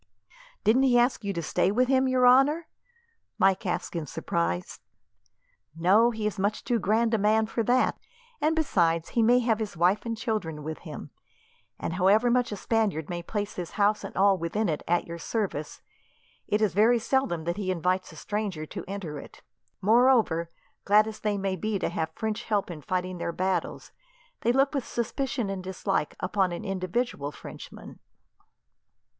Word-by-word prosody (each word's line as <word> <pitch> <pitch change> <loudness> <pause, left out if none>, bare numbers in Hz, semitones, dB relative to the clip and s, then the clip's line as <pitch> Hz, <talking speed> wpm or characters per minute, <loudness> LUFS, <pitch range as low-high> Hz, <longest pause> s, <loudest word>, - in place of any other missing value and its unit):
"Didn't 235 +5 +4
he 255 -2 +4
ask 240 -1 +2
you 200 - -1
to 170 -3 -4
stay 175 - +1
with 245 +5 +2
him, 265 0 +3
your 255 -1 +3
honour?" 280 +6 +5 0.7
Mike 195 +1 +2
asked 175 - -3
in 160 -3 -3
surprise. 85 -7 -2 1.0
"No. 200 +8 +5
He 220 -2 -4
is 210 -1 -2
much 205 +2 -1
too 240 -2 0
grand 225 +4 +1
a 225 - +2
man 215 +2 +3
for 225 +1 -2
that, 250 +2 +2 0.4
and 310 +2 +2
besides, 170 - +1
he 235 - +1
may 240 +2 +5
have 230 -2 +1
his 210 -5 -4
wife 180 +5 +3
and 230 -1 -3
children 190 -11 -3
with 155 +1 -5
him; - - -9 0.7
and - - -3
however 200 +7 +3
much 245 -1 +1
a - - -2
Spaniard 200 -7 -1
may 175 0 -3
place 205 +3 -4
his 175 -2 -5
house 210 +1 +2
and - - -7
all 195 0 +4
within 185 +5 -1
it 150 - -2
at 175 +1 +1
your 170 0 -7
service, 180 -6 -3 0.6
it 210 +1 +1
is 200 -6 +1
very 220 +5 +4
seldom 230 -8 0
that 170 +3 -2
he 200 -3 -3
invites 185 +1 0
a - - -13
stranger 205 -7 -3
to 185 +3 -7
enter 180 -7 -5
it. - - -13 0.4
Moreover, 220 -7 +4 0.3
glad 210 +1 +5
as 220 0 -7
they 210 -1 -1
may 195 -1 -1
be 215 +3 -2
to - - -1
have 160 - -2
French 220 -1 -3
help 205 -4 0
in 155 -3 -8
fighting 185 +3 -3
their 170 - -2
battles, 185 +2 -2 0.5
they 235 - +2
look 270 +3 +2
with 275 -3 -1
suspicion 240 0 -2
and 190 -1 -5
dislike 190 -3 -2
upon 190 0 0
an 175 - -5
individual 185 - -2
Frenchman. - - -11
205 Hz, 180 wpm, -27 LUFS, 180-230 Hz, 1.0 s, honour